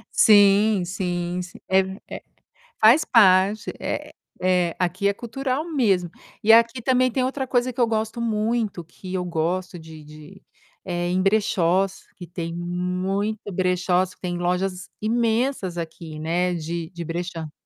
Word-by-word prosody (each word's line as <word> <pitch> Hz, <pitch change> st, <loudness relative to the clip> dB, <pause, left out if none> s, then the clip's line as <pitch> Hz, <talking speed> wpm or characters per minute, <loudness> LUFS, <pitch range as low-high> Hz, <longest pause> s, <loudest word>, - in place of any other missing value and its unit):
Sim 205 Hz, -1 st, +5 dB
sim, 175 Hz, -1 st, -3 dB
sim. 180 Hz, 0 st, -10 dB
É 190 Hz, 0 st, +4 dB, 0.3 s
é, -, -, -8 dB, 0.6 s
faz 235 Hz, +9 st, +6 dB
parte, 200 Hz, -2 st, +4 dB
é -, -, -4 dB, 0.3 s
é, 180 Hz, -2 st, +1 dB
aqui 185 Hz, +3 st, 0 dB
é 200 Hz, -, +2 dB
cultural 260 Hz, +6 st, -3 dB
mesmo. 195 Hz, -, +1 dB, 0.3 s
E 220 Hz, -, +6 dB
aqui 230 Hz, +2 st, +5 dB
também 255 Hz, +1 st, +2 dB
tem 255 Hz, +1 st, 0 dB
outra 265 Hz, +1 st, -2 dB
coisa 250 Hz, 0 st, +1 dB
que 245 Hz, -, -11 dB
eu 235 Hz, -, +4 dB
gosto 220 Hz, +1 st, -2 dB
muito, 220 Hz, -4 st, -1 dB
que 180 Hz, +3 st, -10 dB
eu 180 Hz, -1 st, -1 dB
gosto 175 Hz, +2 st, -2 dB
de 160 Hz, -1 st, -12 dB
de 155 Hz, +5 st, -14 dB, 0.4 s
é 175 Hz, -1 st, -2 dB
em 185 Hz, +1 st, +1 dB
brechós, 195 Hz, -2 st, +1 dB
que 175 Hz, -, -9 dB
tem 170 Hz, 0 st, -5 dB
muito 180 Hz, +4 st, -2 dB
brechós, 180 Hz, 0 st, +1 dB
tem 175 Hz, -1 st, -3 dB
lojas 180 Hz, +1 st, -2 dB
imensas 225 Hz, -3 st, 0 dB
aqui, 160 Hz, -1 st, -7 dB
né, 175 Hz, +3 st, 0 dB
de 165 Hz, 0 st, -4 dB
de 170 Hz, -2 st, -7 dB
brechó. 165 Hz, -2 st, -5 dB
185 Hz, 145 wpm, -23 LUFS, 175-220 Hz, 0.6 s, faz